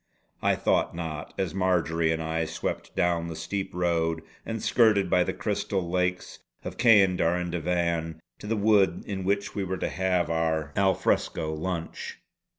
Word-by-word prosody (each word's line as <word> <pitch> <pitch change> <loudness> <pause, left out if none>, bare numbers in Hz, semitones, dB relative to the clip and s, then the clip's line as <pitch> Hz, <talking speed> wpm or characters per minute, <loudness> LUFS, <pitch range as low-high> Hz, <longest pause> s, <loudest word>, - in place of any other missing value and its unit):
I - - +3
thought - - +1
not, 80 -3 -5
as 95 -4 -1
Marjory 85 -3 +1
and 80 0 -1
I 80 +1 -1
swept - - -4
down 85 -1 +1
the 80 - -6
steep 95 +5 -3
road 85 -2 0 0.2
and 115 0 -3
skirted 105 -6 +3
by 90 - +5
the - - -2
crystal 100 -3 -2
lakes 90 0 -1 0.2
of - - -6
Ceander 95 -7 +5
and 90 -1 -3
Davan 85 -1 -1 0.2
to 105 - -8
the 110 +1 0
wood 100 -4 +3
in 95 -2 -4
which 100 +2 0
we 100 - -2
were 95 0 -3
to - - -2
have 90 +2 +1
our 80 -3 0
al 95 -1 +3
fresco 80 0 0
lunch. 85 +1 -4
90 Hz, 165 wpm, -27 LUFS, 80-95 Hz, 0.2 s, by